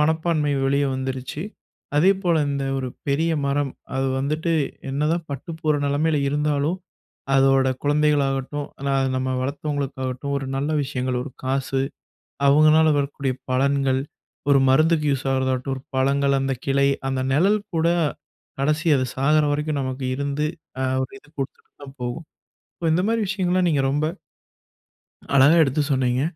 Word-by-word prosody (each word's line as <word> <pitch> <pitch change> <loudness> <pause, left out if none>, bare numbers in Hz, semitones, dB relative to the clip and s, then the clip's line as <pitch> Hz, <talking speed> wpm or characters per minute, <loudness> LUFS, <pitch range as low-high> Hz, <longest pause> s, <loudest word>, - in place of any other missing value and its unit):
மனப்பான்மை 160 -1 +1
வெளியே 140 +1 +2
வந்துருச்சு. 130 +3 -4 0.5
அதே 180 +6 +6
போல 170 -2 +2
இந்த 140 -1 -2
ஒரு 130 - -3 0.2
பெரிய 160 +4 +1
மரம், 140 -1 0 0.2
அது 135 0 0
வந்துட்டு 155 +5 -1 0.4
என்ன 140 +2 -1
தான் 170 -1 -2
பட்டுப்போற 155 +2 -2
நிலைமையில 150 +2 +1
இருந்தாலும், 150 +4 0 0.6
அதோட 135 -1 +4
குழந்தைகளாகட்டும், 145 -1 +1
ஆனா, 140 0 -1 0.2
நம்ம 130 0 -1
வளர்த்தவங்களுக்காகட்டும், 140 -1 -3
ஒரு 135 - -6
நல்ல 145 +3 -1
விஷயங்கள், 130 -2 -2
ஒரு 145 - -7
காசு 135 0 0 0.7
அவங்களால 155 +2 +6
வரக்கூடிய 140 -2 -2 0.2
பலன்கள், 135 0 +2 0.5
ஒரு 140 - +6
மருந்துக்கு 155 +2 +3
யூஸ் 135 0 -3
ஆகறதாகட்டும், 130 0 -1
பழங்கள், 140 +1 +2
அந்த 135 0 0
கிளை, 140 0 +3 0.2
அந்த 130 -1 -1
நிழல் 195 +8 +3 0.2
கூட 160 +1 +2 0.7
கடைசி 155 +4 0
அது 130 - 0
சாகுற 150 +3 +3
வரைக்கும் 150 -1 -1
நமக்கு 130 0 -4
இருந்து 140 +2 -1 0.3
அ - - 0 0.2
ஒரு 130 - -6
இது 150 - -23
குடுத்துட்டு 135 0 -6
தான் 135 0 -11
போகும். 125 +7 -4 0.5
ஸோ 170 - -8
இந்த 180 +3 +2
மாதிரி 230 0 +1
விஷயங்கள்லாம் 185 -2 +1
நீங்க 145 -4 +2
ரொம்ப 145 +2 0 1.3
அழகா 140 +5 +6
எடுத்து 145 +1 +1
சொன்னீங்க. 130 0 +1
140 Hz, 135 wpm, -23 LUFS, 135-155 Hz, 1.3 s, அதே